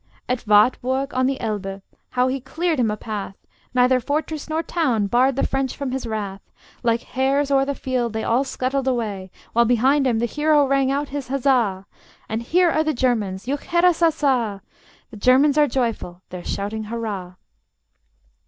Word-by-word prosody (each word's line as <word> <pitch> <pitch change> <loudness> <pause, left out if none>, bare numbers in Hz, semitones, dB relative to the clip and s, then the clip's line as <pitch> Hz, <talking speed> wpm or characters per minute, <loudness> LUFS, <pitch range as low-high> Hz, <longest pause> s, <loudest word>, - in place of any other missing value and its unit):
At 250 -2 -2
Wartburg, 255 +6 +3
on 255 0 +2
the 270 0 -1
Elbe, 200 -4 -3 0.3
how 250 0 +1
he 265 +1 -2
cleared 320 +4 -1
him 235 -3 +2
a 210 - -2
path! 205 -3 -5 0.4
Neither 255 0 +3
fortress 305 +4 -3
nor 320 +1 -1
town 260 - 0
barred 250 +6 +2
the 275 - 0
French 270 -1 -2
from 280 -3 -3
his 260 -2 -3
wrath; 200 -3 -4 0.4
Like 230 -1 +1
hares 275 +2 0
o'er 270 0 +4
the 280 0 -2
field 250 -4 -2
they 220 0 -2
all 240 +4 +2
scuttled 265 0 -2
away, 210 -7 -2 0.2
While 235 +1 +4
behind 260 +4 +3
them 235 -3 +1
the 235 - +1
hero 295 +3 +2
rang 275 -1 +2
out 280 +1 -1
his 280 -2 -5
Huzza! 245 -8 +1 0.4
And 220 +1 -3
here 345 +8 +3
are 310 - +2
the 310 -2 -1
Germans: 215 -7 0
juchheirassassa! 290 - +1 0.5
The 220 - -10
Germans 270 +6 +4
are 295 - +5
joyful: 230 -8 -3
they're 180 -1 -7
shouting 215 +2 -3
hurrah! 210 -5 -5
255 Hz, 170 wpm, -22 LUFS, 220-275 Hz, 0.5 s, are